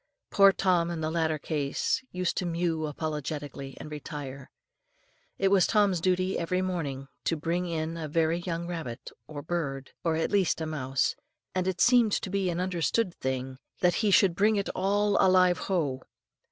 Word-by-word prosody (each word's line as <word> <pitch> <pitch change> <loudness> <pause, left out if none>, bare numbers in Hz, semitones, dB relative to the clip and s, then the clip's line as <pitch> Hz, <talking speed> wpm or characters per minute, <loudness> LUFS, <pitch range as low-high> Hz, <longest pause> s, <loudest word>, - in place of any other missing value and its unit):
Poor 195 0 +7
Tom 180 -3 +1
in 170 -1 -3
the 155 0 -1
latter 160 -2 0
case 145 - -1
used 180 -1 -1
to - - 0
mew 165 -2 -1
apologetically, 145 -2 -5
and 155 - -8
retire. 145 -3 -7 0.9
It 195 - +2
was 195 -2 +4
Tom's 200 -5 +2
duty 185 +1 +1
every 180 +2 0
morning 145 -7 -3 0.2
to 165 - +1
bring 170 +3 -1
in 165 0 -3
a 160 -2 -4
very 165 +2 +1
young 170 -1 -3
rabbit, 135 -8 -6 0.2
a 150 -2 -6
bird, 140 -5 -3
or 165 -2 +1
at 160 - -1
least 195 -6 +2
a 160 - -2
mouse, 135 -4 0 0.4
and 185 0 -1
it 185 -1 -1
seemed 240 -1 +5
to 190 - -1
be 195 -2 0
an 170 0 -2
understood 185 +2 0
thing 130 -1 -4 0.2
that 180 -1 +4
he 215 - +2
should 195 -2 +5
bring 210 +5 +3
it 200 -1 -1
"all 200 +2 +2
alive 185 -1 +4
ho!" 145 -9 0
170 Hz, 175 wpm, -28 LUFS, 150-185 Hz, 0.9 s, Poor